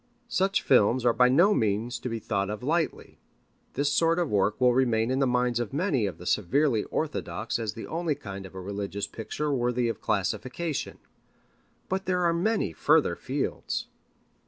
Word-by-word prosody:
Such 195 Hz, -1 st, +1 dB
films 125 Hz, 0 st, +4 dB
are 120 Hz, -, +5 dB
by 125 Hz, +1 st, +4 dB
no 175 Hz, +11 st, +5 dB
means 115 Hz, -, 0 dB
to 125 Hz, -, -4 dB
be 115 Hz, -, -2 dB
thought 100 Hz, -3 st, -2 dB
of 105 Hz, +3 st, -5 dB
lightly. 160 Hz, +4 st, -2 dB, 0.6 s
This 145 Hz, +1 st, +1 dB
sort 165 Hz, 0 st, +3 dB
of 175 Hz, -4 st, 0 dB
work 105 Hz, +1 st, +1 dB
will 125 Hz, -1 st, +4 dB
remain 120 Hz, -2 st, +2 dB
in 130 Hz, -, +1 dB
the 135 Hz, -, +3 dB
minds 125 Hz, -1 st, +1 dB
of 120 Hz, -1 st, -3 dB
many 145 Hz, -, +1 dB
of 95 Hz, -, -6 dB
the 90 Hz, -, -11 dB
severely 115 Hz, -, +1 dB
orthodox -, -, -3 dB
as 110 Hz, -2 st, -3 dB
the 110 Hz, -, -6 dB
only 165 Hz, -2 st, -1 dB
kind 95 Hz, -4 st, -8 dB
of 95 Hz, -, -17 dB
a -, -, -5 dB
religious 100 Hz, +1 st, -4 dB
picture 140 Hz, +7 st, -3 dB
worthy 125 Hz, -1 st, +1 dB
of 115 Hz, -, -5 dB
classification. 130 Hz, -, -2 dB, 0.9 s
But 190 Hz, +1 st, -2 dB
there 180 Hz, -1 st, +1 dB
are 170 Hz, -1 st, +3 dB
many 175 Hz, -, 0 dB
further -, -, +3 dB
fields. -, -, -3 dB
125 Hz, 180 wpm, -27 LUFS, 105-155 Hz, 0.9 s, are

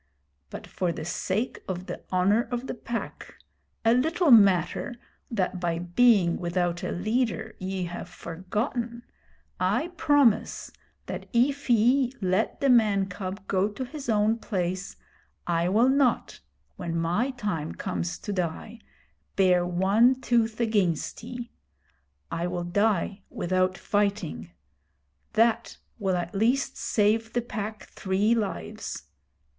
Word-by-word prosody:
But -, -, -8 dB
for 180 Hz, -2 st, -2 dB
the 155 Hz, -, -6 dB
sake 200 Hz, +7 st, -2 dB
of 185 Hz, -1 st, -4 dB
the -, -, -6 dB
Honour 195 Hz, +5 st, +3 dB
of 245 Hz, +1 st, -3 dB
the -, -, -4 dB
Pack, 235 Hz, 0 st, -6 dB, 0.5 s
a 225 Hz, -, +6 dB
little 320 Hz, +5 st, +2 dB
matter 195 Hz, 0 st, +4 dB, 0.3 s
that 190 Hz, -5 st, -1 dB
by 170 Hz, -2 st, -1 dB
being 175 Hz, 0 st, +3 dB
without 175 Hz, -1 st, -1 dB
a -, -, -3 dB
leader 220 Hz, +3 st, -1 dB
ye 185 Hz, 0 st, -3 dB
have 175 Hz, 0 st, -6 dB
forgotten, 230 Hz, -, -4 dB, 0.6 s
I 235 Hz, -, +1 dB
promise 285 Hz, -7 st, +2 dB, 0.3 s
that -, -, -6 dB
if 270 Hz, +4 st, +1 dB
ye 245 Hz, +3 st, +4 dB
let 190 Hz, +2 st, 0 dB
the 275 Hz, -, +3 dB
man 205 Hz, -5 st, +4 dB
cub 190 Hz, +2 st, -6 dB
go 195 Hz, +1 st, +1 dB
to 235 Hz, +5 st, -5 dB
his 275 Hz, 0 st, -7 dB
own 215 Hz, +1 st, +2 dB
place, 185 Hz, -3 st, -3 dB, 0.5 s
I 170 Hz, 0 st, +1 dB
will 225 Hz, +6 st, +4 dB
not, 265 Hz, -2 st, +2 dB, 0.4 s
when 170 Hz, -2 st, -3 dB
my 175 Hz, +10 st, +1 dB
time 205 Hz, -, -3 dB
comes 85 Hz, 0 st, -3 dB
to 205 Hz, -, -4 dB
die, 185 Hz, +5 st, -3 dB, 0.6 s
bare 180 Hz, -2 st, +3 dB
one 200 Hz, +8 st, +3 dB
tooth 230 Hz, -3 st, +1 dB
against 205 Hz, -8 st, 0 dB
ye. 245 Hz, +1 st, -7 dB, 0.8 s
I 170 Hz, +1 st, -1 dB
will 175 Hz, -1 st, -3 dB
die 200 Hz, +2 st, 0 dB
without 185 Hz, +1 st, 0 dB
fighting. 200 Hz, -, -1 dB, 0.8 s
That 225 Hz, +1 st, +2 dB, 0.2 s
will 190 Hz, -3 st, +1 dB
at 175 Hz, -1 st, -4 dB
least 235 Hz, +7 st, +1 dB
save 225 Hz, +2 st, +1 dB
the 240 Hz, -, 0 dB
Pack 215 Hz, -2 st, -5 dB
three 200 Hz, +3 st, 0 dB
lives. 195 Hz, -, -3 dB
205 Hz, 130 wpm, -27 LUFS, 180-235 Hz, 0.8 s, a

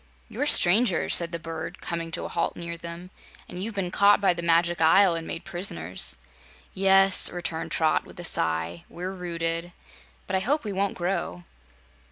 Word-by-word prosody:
"You're 290 Hz, -, -3 dB
strangers," 190 Hz, -, +4 dB
said 170 Hz, -1 st, +6 dB
the 170 Hz, -, -3 dB
bird, 165 Hz, -1 st, -7 dB
coming 170 Hz, -1 st, -5 dB
to 165 Hz, -, -3 dB
a -, -, -3 dB
halt -, -, -2 dB
near 170 Hz, 0 st, -6 dB
them, 170 Hz, +2 st, -9 dB, 0.4 s
"and 180 Hz, -, -8 dB
you've 220 Hz, 0 st, -6 dB
been 185 Hz, -3 st, -3 dB
caught 200 Hz, +2 st, +4 dB
by 195 Hz, -3 st, +2 dB
the 170 Hz, -, -6 dB
Magic 170 Hz, 0 st, +1 dB
Isle 180 Hz, +3 st, +5 dB
and 165 Hz, -1 st, -5 dB
made 165 Hz, -, -6 dB
prisoners." 90 Hz, -, -3 dB, 0.6 s
"Yes," 195 Hz, 0 st, +4 dB
returned 170 Hz, -2 st, -5 dB
Trot, 160 Hz, -1 st, +1 dB
with -, -, -14 dB
a -, -, -6 dB
sigh; 80 Hz, -, -1 dB
"we're 180 Hz, +2 st, -6 dB
rooted. 170 Hz, -1 st, -3 dB, 0.5 s
But 190 Hz, -, -3 dB
I -, -, +2 dB
hope 280 Hz, +10 st, -1 dB
we 210 Hz, -3 st, -5 dB
won't 195 Hz, +1 st, -2 dB
grow." 175 Hz, -, -3 dB
175 Hz, 180 wpm, -25 LUFS, 165-190 Hz, 0.6 s, said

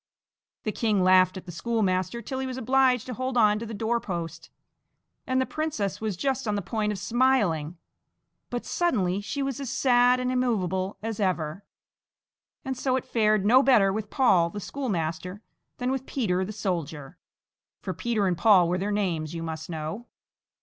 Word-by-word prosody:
The 215 Hz, -, -1 dB
king 210 Hz, -3 st, +1 dB
laughed 185 Hz, 0 st, +5 dB
at 185 Hz, -, -9 dB
the 175 Hz, -, -8 dB
schoolmaster 210 Hz, +2 st, -1 dB
till 260 Hz, -1 st, -4 dB
he 265 Hz, -, -2 dB
was 255 Hz, -1 st, -5 dB
obliged 260 Hz, -1 st, +2 dB
to 255 Hz, -, -5 dB
hold 255 Hz, +1 st, -3 dB
on 210 Hz, -2 st, +4 dB
to 230 Hz, -, -6 dB
the 225 Hz, -, -6 dB
door 230 Hz, +2 st, 0 dB
post, 170 Hz, -5 st, -6 dB, 0.8 s
and 260 Hz, 0 st, +1 dB
the 260 Hz, -, +2 dB
princess 290 Hz, -13 st, -3 dB
was 215 Hz, -5 st, -2 dB
just 265 Hz, +3 st, -1 dB
on 210 Hz, -, 0 dB
the 200 Hz, -, -2 dB
point 215 Hz, 0 st, -1 dB
of 210 Hz, -, -3 dB
smiling, 200 Hz, -, +1 dB, 0.7 s
but 245 Hz, -1 st, -4 dB
suddenly 200 Hz, -, 0 dB
she 275 Hz, +7 st, -3 dB
was 270 Hz, -2 st, -3 dB
as 275 Hz, -3 st, -4 dB
sad 250 Hz, -1 st, +4 dB
and 255 Hz, 0 st, -1 dB
immovable 195 Hz, -7 st, 0 dB
as 225 Hz, -1 st, -4 dB
ever, 180 Hz, -2 st, -1 dB, 1.0 s
and 265 Hz, 0 st, -2 dB
so 260 Hz, 0 st, 0 dB
it 260 Hz, -, -2 dB
fared 215 Hz, -5 st, +2 dB
no 250 Hz, +5 st, +6 dB
better 215 Hz, -8 st, +4 dB
with 210 Hz, 0 st, -4 dB
Paul 185 Hz, -11 st, +3 dB
the 205 Hz, -, -6 dB
schoolmaster 185 Hz, -, -4 dB, 0.3 s
than 250 Hz, +1 st, -1 dB
with 265 Hz, -1 st, -3 dB
Peter 190 Hz, -8 st, 0 dB
the 195 Hz, -, -5 dB
soldier 165 Hz, -9 st, -4 dB, 0.6 s
for 185 Hz, -, -4 dB
Peter 225 Hz, -2 st, -1 dB
and 180 Hz, -2 st, +1 dB
Paul 185 Hz, -2 st, +5 dB
were 180 Hz, +2 st, 0 dB
their 200 Hz, +2 st, -2 dB
names, 170 Hz, -6 st, -1 dB
you 165 Hz, -, -4 dB
must 160 Hz, 0 st, -6 dB
know! 160 Hz, +8 st, -5 dB
210 Hz, 180 wpm, -26 LUFS, 185-250 Hz, 1.0 s, no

